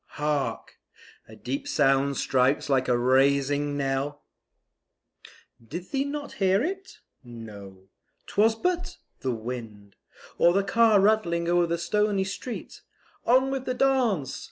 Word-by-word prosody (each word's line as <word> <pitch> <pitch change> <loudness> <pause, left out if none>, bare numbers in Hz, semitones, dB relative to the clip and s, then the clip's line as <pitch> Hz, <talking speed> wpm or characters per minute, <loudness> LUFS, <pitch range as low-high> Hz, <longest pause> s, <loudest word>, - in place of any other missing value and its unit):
hark! 150 -2 -2 0.5
a - - -13
deep 135 +3 -5
sound 135 -1 +2
strikes 130 +3 +1
like 130 -2 +2
a 125 - +2
rising 140 +3 +2
knell, 140 +1 -2 1.4
Did 175 - -8
ye 275 0 +1
not 290 0 -5
hear 195 +3 +3
it? 380 +3 -5 0.3
No; 105 -6 -11 0.4
'twas 220 +2 +2
but; 360 +7 -2 0.2
the 130 - -2
wind, 110 -3 -8 0.4
Or 170 - +5
the 200 +1 +2
car 220 +1 +4
rattling 190 -5 +2
o'er 175 0 +3
the 170 0 -1
stony 210 +2 0
street; 205 +5 -7 0.5
On 260 +2 +4
with 265 -1 -3
the 255 - -2
dance! 245 - +1
165 Hz, 130 wpm, -26 LUFS, 135-220 Hz, 1.4 s, Or